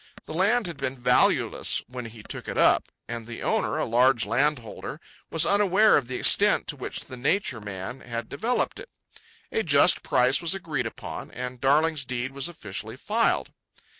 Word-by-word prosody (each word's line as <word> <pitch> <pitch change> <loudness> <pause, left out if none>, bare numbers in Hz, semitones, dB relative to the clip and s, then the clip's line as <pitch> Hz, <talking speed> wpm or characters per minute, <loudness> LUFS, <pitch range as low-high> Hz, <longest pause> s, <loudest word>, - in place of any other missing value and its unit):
The - - -8
land 205 +7 +2
had 170 -4 -6
been 135 -1 -3
valueless 125 0 +3
when 125 0 -7
he 110 -1 -11
took - - -8
it - - -4
up, - - +4 0.2
and 115 -1 -6
the 120 - -7
owner, - - 0
a - - 0
large 120 -1 +3
landholder, 120 0 -2 0.3
was 165 - +3
unaware 205 +1 +4
of 135 - +1
the 130 - -5
extent 205 +9 +5
to 150 - -2
which 130 - -6
the 130 - -8
Nature 130 - -1
Man 105 +5 -7
had 115 -2 -6
developed 225 - -2
it. - - -11 0.6
A - - 0
just 145 -8 +4
price 125 +5 +2
was 170 +2 +3
agreed 150 -10 -3
upon, - - -8
and 125 0 -7
Darling's 150 +2 +2
deed 125 0 -3
was 135 0 -2
officially 110 - -7
filed. 225 - 0
130 Hz, 175 wpm, -25 LUFS, 120-165 Hz, 0.6 s, extent